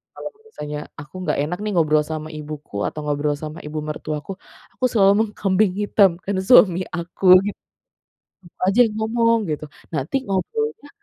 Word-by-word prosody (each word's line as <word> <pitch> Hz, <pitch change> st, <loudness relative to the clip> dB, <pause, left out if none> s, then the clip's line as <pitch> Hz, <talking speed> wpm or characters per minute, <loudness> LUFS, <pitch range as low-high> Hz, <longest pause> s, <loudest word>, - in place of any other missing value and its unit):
kalau -, -, -6 dB, 0.2 s
misalnya 150 Hz, -, -6 dB, 0.2 s
aku 145 Hz, 0 st, -11 dB
nggak -, -, +1 dB
enak 170 Hz, +4 st, -3 dB
nih 215 Hz, -, -2 dB
ngobrol 155 Hz, -2 st, +3 dB
sama 155 Hz, 0 st, -5 dB
ibuku 150 Hz, -6 st, -9 dB
atau -, -, -6 dB
ngobrol 145 Hz, 0 st, 0 dB
sama 155 Hz, +1 st, -6 dB
ibu 150 Hz, +1 st, -4 dB
mertuaku. 150 Hz, +1 st, -5 dB, 0.4 s
Aku 255 Hz, -, -1 dB
selalu 200 Hz, -3 st, +5 dB
mengkambing 195 Hz, -1 st, +1 dB
hitamkan 195 Hz, -2 st, +2 dB
suami 185 Hz, -8 st, +6 dB
aku 170 Hz, +3 st, -6 dB, 0.2 s
gitu, 205 Hz, -, -5 dB, 0.8 s
"Kamu 175 Hz, -2 st, -20 dB
aja 220 Hz, -, 0 dB
yang 220 Hz, -, -3 dB
ngomong 230 Hz, +1 st, +2 dB
gitu. 150 Hz, 0 st, -4 dB, 0.3 s
Nanti 150 Hz, -, -3 dB
ngobrolnya 290 Hz, -, -2 dB
180 Hz, 150 wpm, -21 LUFS, 150-210 Hz, 0.8 s, suami